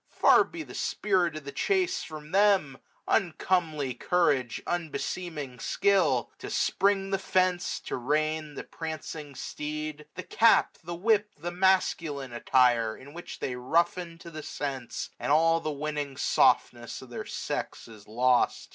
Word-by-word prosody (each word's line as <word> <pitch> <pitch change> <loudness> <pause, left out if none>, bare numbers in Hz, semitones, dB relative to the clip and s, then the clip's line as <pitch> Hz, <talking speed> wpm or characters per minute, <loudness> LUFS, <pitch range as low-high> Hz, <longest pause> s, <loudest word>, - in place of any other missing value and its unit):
Far - - +5
be 330 -2 -7
the - - -12
spirit 185 -6 0
of 155 - -6
the 140 - -7
chase 380 - 0
from 155 -1 -9
them; 195 -9 +3 0.3
Uncomely 165 -7 0
courage, 130 -4 +1
unbeseeming 160 -4 -4
skill; 165 -12 +2
To - - -7
spring 195 0 +1
the 195 - +1
fence, 185 -1 +1
to - - -4
rein 155 +3 -1
the - - -5
prancing 155 -3 -7
steed 155 +1 -5
j 150 - -13
S7S 150 - -43
The 185 - -5
cap, 230 0 +3
the 170 +1 -5
whip, 210 +3 +2
the 170 +4 -5
masculine 170 -7 +1
attire. 120 -2 +3
In 140 +2 -13
which 175 +1 -8
they 125 - -3
roughen 165 +6 0
to 170 - -10
the 155 -1 -7
sense, 135 -5 -5
and - - -1
all 165 +2 +4
The 155 - -3
winning 145 -2 -4
softness 120 +1 +2
of 125 - -14
their - - -5
sex - - -4
is 110 -3 -14
lost. 125 +3 +2
155 Hz, 155 wpm, -28 LUFS, 135-180 Hz, 0.3 s, Far